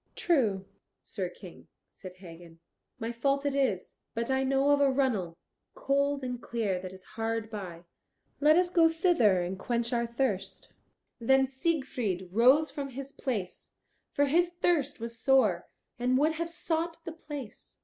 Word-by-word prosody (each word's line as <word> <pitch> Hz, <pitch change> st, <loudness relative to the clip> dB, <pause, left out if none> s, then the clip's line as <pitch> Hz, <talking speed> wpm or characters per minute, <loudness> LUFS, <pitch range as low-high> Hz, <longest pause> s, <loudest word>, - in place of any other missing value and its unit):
"True, 220 Hz, -, +1 dB, 0.4 s
Sir -, -, -4 dB
King," -, -, -13 dB, 0.2 s
said 185 Hz, -2 st, -11 dB
Hagen, 170 Hz, -2 st, -13 dB, 0.4 s
"my 225 Hz, +1 st, -3 dB
fault 275 Hz, +4 st, 0 dB
it 285 Hz, -, +1 dB
is. 260 Hz, -10 st, -1 dB, 0.2 s
But 230 Hz, +3 st, -1 dB
I 265 Hz, 0 st, +2 dB
know 270 Hz, +2 st, +2 dB
of 285 Hz, 0 st, +4 dB
a 280 Hz, -, +5 dB
runnel, 230 Hz, -11 st, 0 dB, 0.4 s
cold 280 Hz, 0 st, 0 dB
and 250 Hz, -1 st, -4 dB
clear, 210 Hz, -6 st, -2 dB
that 185 Hz, 0 st, -7 dB
is 190 Hz, 0 st, -12 dB
hard 225 Hz, 0 st, -3 dB
by. 180 Hz, -5 st, -7 dB, 0.6 s
Let 305 Hz, +2 st, +5 dB
us 355 Hz, 0 st, +2 dB
go 330 Hz, -2 st, +5 dB
thither 320 Hz, -, +3 dB
and 185 Hz, +2 st, -4 dB
quench 235 Hz, +2 st, -1 dB
our 235 Hz, 0 st, 0 dB
thirst." 235 Hz, -5 st, -2 dB, 0.5 s
Then 265 Hz, +3 st, +4 dB
Siegfried 265 Hz, -, -2 dB
rose 260 Hz, +9 st, +5 dB
from 280 Hz, -1 st, -5 dB
his 270 Hz, +1 st, -7 dB
place, 215 Hz, -11 st, -5 dB, 0.4 s
for 285 Hz, -, +2 dB
his 340 Hz, +5 st, +3 dB
thirst 335 Hz, -6 st, 0 dB
was 230 Hz, 0 st, -6 dB
sore, 225 Hz, -10 st, +3 dB, 0.3 s
and 250 Hz, +1 st, +2 dB
would 300 Hz, +4 st, +3 dB
have 330 Hz, +1 st, -3 dB
sought 330 Hz, 0 st, -3 dB
the 335 Hz, -, -5 dB
place. 290 Hz, -7 st, -9 dB
260 Hz, 160 wpm, -29 LUFS, 215-285 Hz, 0.6 s, a